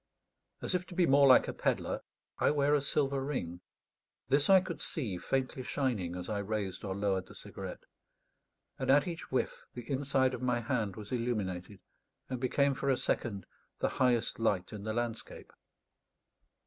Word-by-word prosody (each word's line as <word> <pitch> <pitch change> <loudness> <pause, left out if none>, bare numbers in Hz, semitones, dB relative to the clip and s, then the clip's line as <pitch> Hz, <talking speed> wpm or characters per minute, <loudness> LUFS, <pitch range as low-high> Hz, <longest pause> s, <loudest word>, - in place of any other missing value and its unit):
As - - 0
if 180 0 -1
to 180 - -10
be 180 -1 +4
more 140 -1 +6
like 130 - +7
a - - -3
pedlar, - - -1 0.4
I - - +4
wear 145 0 +3
a 145 - +4
silver 140 -1 0
ring. 90 - -3 0.7
This 140 +4 +3
I 190 -1 +9
could 170 -5 -5
see 105 - -2
faintly 130 +2 -1
shining 120 -10 -1
as 90 0 -5
I 105 -2 -1
raised 100 -2 -3
or 95 -2 -3
lowered 95 -2 0
the - - -13
cigarette; - - -7 1.0
and - - -2
at 145 +4 +5
each 170 -1 -6
whiff 130 - -1
the 120 -1 -7
inside 135 -1 +1
of 125 - -5
my 125 -1 +1
hand 115 -5 -1
was 105 -2 -9
illuminated, 105 -6 -2 0.5
and 130 - -2
became 140 +2 +2
for 140 +1 -2
a 130 - +3
second 100 -6 -1 0.3
the - - +1
highest 125 -4 +1
light 100 -5 0
in 105 -1 -7
the 110 - -1
landscape. 120 -1 -4
125 Hz, 175 wpm, -32 LUFS, 105-140 Hz, 1.0 s, I